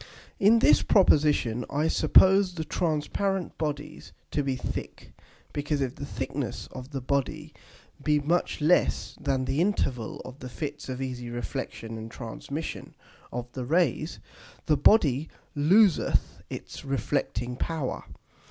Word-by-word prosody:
In 210 +4 +6
this - - +5
Proposition 145 - +3
I 150 +3 +1
suppose 190 +2 +5
the 160 -2 -3
transparent 180 +4 -1
Bodies 150 -1 -4 0.2
to 145 - +1
be 135 -2 -1
thick; 125 - -6 0.4
because 145 0 -1
if 130 -2 -1
the 140 - -6
thickness 130 -3 -4
of 130 0 -8
the 135 -2 -4
Body 145 +4 -2 0.5
be 150 -1 +3
much 160 +2 0
less 165 +4 +2
than 130 -1 0
the 135 +5 0
Interval 135 - -1
of 130 +2 -10
the 125 - -7
Fits 145 +2 -6
of 130 +1 -3
easy 125 -2 -5
Reflexion 115 0 -5
and 110 +1 -7
Transmission 130 +7 -6 0.4
of 120 0 -5
the 130 - -5
Rays, 155 +2 +1 0.5
the 155 - +3
Body 145 - +4 0.3
loseth 180 +6 +3
its - - -7
reflecting 135 -3 -1
power. 155 0 -3
145 Hz, 135 wpm, -27 LUFS, 130-160 Hz, 0.5 s, In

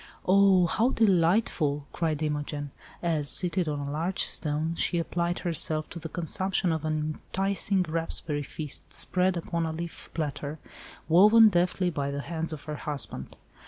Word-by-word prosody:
"Oh! 190 -1 +5
how 220 +8 +2
delightful," 175 - +2
cried 160 -2 -1
Imogen, 145 -1 -3 0.3
as, 155 -4 +1
seated 180 -1 +1
on 150 - -2
a 140 0 -4
large 165 +5 -1
stone 155 +1 -1
she 170 - 0
applied 170 +1 -1
herself 155 -2 -1
to 170 - -6
the 160 0 -7
consumption 185 +2 0
of 160 -1 -2
an 155 0 0 0.4
enticing 195 0 +1
raspberry 160 -2 -2
feast 150 +1 -5
spread 185 0 +1
upon 170 0 -2
a - - -2
leaf 165 +1 -7
platter, 150 -1 -3 0.5
woven 215 +7 +7
deftly 180 0 +1
by 140 -3 -2
the 140 0 -3
hands 165 +1 -3
of 155 - -7
her 150 0 -5
husband. 145 - -3
165 Hz, 155 wpm, -28 LUFS, 150-180 Hz, 0.5 s, woven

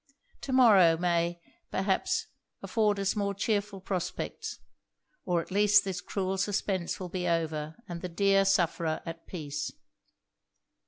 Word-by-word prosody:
To 270 - -5
morrow 200 -10 +6
may, 170 0 0 0.3
perhaps, 360 - 0 0.4
afford 210 -3 +1
us 195 +2 0
more 200 -1 -1
chearful 205 -1 -1
prospects 180 -1 -4 0.7
or 175 -2 +1
at - - -18
least 205 +1 +5
this 185 -2 -4
cruel 190 0 -2
suspense 195 -3 -1
will 185 - -4
be 180 0 -2
over, 160 -2 -1
and 170 -1 -6
the 180 - -4
dear 195 +2 +3
sufferer 170 -4 +1
at 165 0 -8
peace.' 150 -4 -4
190 Hz, 130 wpm, -29 LUFS, 170-200 Hz, 0.7 s, morrow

